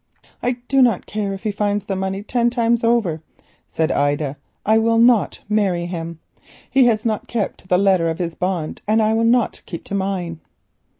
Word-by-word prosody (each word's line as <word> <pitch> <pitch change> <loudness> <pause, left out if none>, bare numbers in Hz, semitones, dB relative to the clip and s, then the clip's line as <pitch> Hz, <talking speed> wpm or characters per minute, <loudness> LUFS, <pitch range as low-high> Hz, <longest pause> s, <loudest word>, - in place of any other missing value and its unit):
"I 245 - +1
do 270 -1 +3
not 235 -7 +3
care 210 -2 -3
if 195 +1 -6
he 215 - 0
finds 205 0 -1
the 195 - -2
money 190 +1 -3
ten 240 +2 +1
times 235 -1 +1
over," 220 -9 +1 0.5
said 160 -1 0
Ida, 145 0 0 0.3
"I 220 +1 +4
will 230 0 +2
not 235 -2 +3
marry 195 -5 +1
him. 170 -2 -5 0.5
He 265 0 +5
has 230 -1 +2
not 220 -2 -1
kept 220 -5 -2
to - - -19
the 180 - +3
letter 190 -3 +3
of 165 - -3
his 170 -2 -3
bond 180 -3 -3
and 215 +1 +3
I 220 0 +2
will 225 +1 +1
not 235 +1 +2
keep 170 - -7
to - - -9
mine." 190 -4 -2
200 Hz, 195 wpm, -20 LUFS, 175-230 Hz, 0.5 s, He